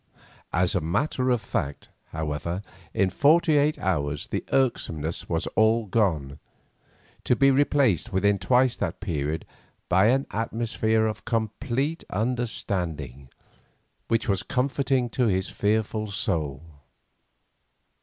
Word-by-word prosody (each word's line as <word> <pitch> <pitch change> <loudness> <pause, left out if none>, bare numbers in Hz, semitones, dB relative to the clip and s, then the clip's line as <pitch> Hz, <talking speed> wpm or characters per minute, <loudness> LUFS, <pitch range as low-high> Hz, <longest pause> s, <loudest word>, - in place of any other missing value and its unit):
As 90 +1 +1
a 90 - +1
matter 125 - 0
of 120 -3 +2
fact, 70 +1 -4 0.2
however, 80 +4 -4 0.3
in 95 -4 +1
forty 155 - +4
eight 150 +1 +3
hours 75 -6 -2
the - - -2
irksomeness 85 - -1
was 80 -1 0
all 110 +1 +3
gone, 80 -10 0 0.8
to 125 - +2
be 135 +3 +5
replaced 130 - +2
within 100 +1 +2
twice 125 +6 +3
that 90 -5 -3
period 80 -5 -2 0.4
by 95 +3 +5
an 135 +3 +2
atmosphere 110 0 0
of 110 -1 -3
complete 120 +7 -2
understanding, 90 - -2 0.8
which 115 +2 0
was 100 -3 +1
comforting 130 -1 0
to 125 -3 +1
his 95 -2 0
fearful 110 0 0
soul. 80 -8 -2
105 Hz, 115 wpm, -26 LUFS, 85-125 Hz, 0.8 s, be